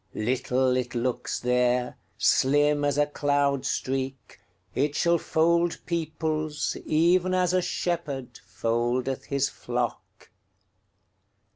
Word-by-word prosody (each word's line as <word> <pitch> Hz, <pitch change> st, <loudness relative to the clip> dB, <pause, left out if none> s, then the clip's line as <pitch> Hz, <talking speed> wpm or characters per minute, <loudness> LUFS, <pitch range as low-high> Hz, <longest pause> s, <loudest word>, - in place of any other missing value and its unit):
Little 125 Hz, +2 st, +1 dB
it 125 Hz, -1 st, -3 dB
looks 120 Hz, +1 st, -2 dB
there, 125 Hz, 0 st, +1 dB, 0.2 s
Slim 145 Hz, +7 st, +3 dB
as 145 Hz, -1 st, +1 dB
a 145 Hz, -, +4 dB
cloud 145 Hz, -2 st, 0 dB
streak; 135 Hz, 0 st, -3 dB, 0.3 s
It 145 Hz, +2 st, 0 dB
shall 170 Hz, -1 st, +3 dB
fold 170 Hz, +2 st, +2 dB
peoplesEven 160 Hz, +2 st, 0 dB
as 180 Hz, -1 st, +2 dB
a 185 Hz, -, +4 dB
shepherdFoldeth 125 Hz, -, -2 dB
his 140 Hz, -1 st, 0 dB
flock. 120 Hz, -2 st, -5 dB
140 Hz, 95 wpm, -26 LUFS, 125-155 Hz, 0.3 s, a